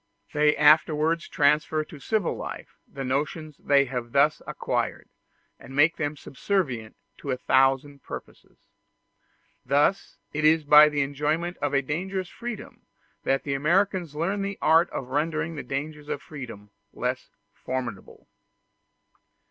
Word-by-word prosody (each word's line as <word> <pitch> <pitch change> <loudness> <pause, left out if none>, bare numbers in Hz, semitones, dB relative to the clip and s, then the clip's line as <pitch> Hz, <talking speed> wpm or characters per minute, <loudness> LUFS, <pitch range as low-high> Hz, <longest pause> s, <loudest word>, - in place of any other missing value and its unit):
They 150 0 +3
afterwards 155 +2 +4
transfer 150 +2 +2
to 150 -1 -12
civil 215 +5 -1
life - - -8
the 135 - -7
notions 150 +3 -2
they 140 -1 +3
have 125 -2 -5
thus 145 +2 +3
acquired, - - -3 0.5
and 135 - -11
make 150 +4 +4
them 145 0 -2
subservient 135 - -2 0.2
to 140 - -7
a 130 - 0
thousand 135 +2 +2
purposes. - - -10 1.1
Thus 145 +9 +1 0.2
it 150 +1 -2
is 155 +1 +5
by 150 +1 +8
the 145 -1 0
enjoyment 150 +5 -1
of 145 -1 -1
a 140 - +2
dangerous 185 +6 -3
freedom 240 -2 -8 0.4
that 135 0 +1
the 140 - -2
Americans 175 +2 +1
learn 190 +6 -1
the 195 0 -3
art 165 +2 +4
of 125 - -6
rendering 155 +3 -1
the 145 - -4
dangers 150 +2 -5
of - - -2
freedom 115 -8 -9 0.2
less - - -3 0.2
formidable. 125 -6 -6
150 Hz, 135 wpm, -26 LUFS, 140-160 Hz, 1.1 s, by